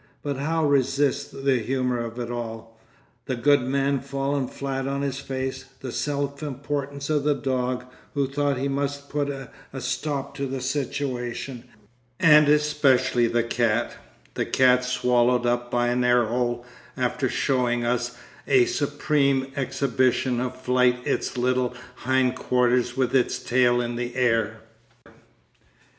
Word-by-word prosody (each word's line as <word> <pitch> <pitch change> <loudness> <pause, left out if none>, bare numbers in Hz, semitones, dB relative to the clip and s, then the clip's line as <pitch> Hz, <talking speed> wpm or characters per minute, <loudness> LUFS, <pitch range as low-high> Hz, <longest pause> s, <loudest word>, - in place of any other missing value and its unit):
But 140 -2 -2
how 160 +3 0
resist 140 0 +1
the 135 -3 +3
humour 125 +1 -1
of 115 0 -5
it 120 -1 -4
all: 115 -1 -6 0.5
the 130 - -1
good 140 +3 +4
man 135 +2 0
fallen 140 0 -2
flat 135 0 -4
on 140 +1 -2
his 135 -1 -2
face, 130 -1 -4 0.2
the 130 - -5
self 140 0 -2
importance 140 0 -4
of 150 -2 +1
the 145 0 +2
dog, 125 -1 -2 0.3
who 140 -1 +1
thought 140 0 0
he 135 +2 -1
must 140 0 -3
put 145 -1 -1
a 135 -2 -6 0.3
stop 135 +2 -3
to 140 -1 -2
the 135 0 -4
situation, 130 -2 -3 0.5
and 150 -2 +7
especially 150 -5 +3
the 120 0 +1
cat, 115 -1 0 0.4
the - - -1
cat 125 -1 +4
swallowed 125 -1 +2
up 120 0 0
by 120 0 +1
an 125 0 +1
air 120 -1 +4
hole 120 +1 -1 0.3
after - - 0
showing 120 -2 +1
us 125 0 -1 0.3
as - - +2
a - - +5
supreme 140 - 0
exhibition 130 -2 +1
of 130 +1 -3
flight 125 -1 +2
its - - -1
little 125 0 +1 0.2
hindquarters 125 -1 +1
with 130 0 +1
its 125 - +2
tail 120 -1 +2
in 120 0 -2
the 120 0 -4
air. 115 -3 +1
130 Hz, 145 wpm, -25 LUFS, 120-140 Hz, 0.5 s, and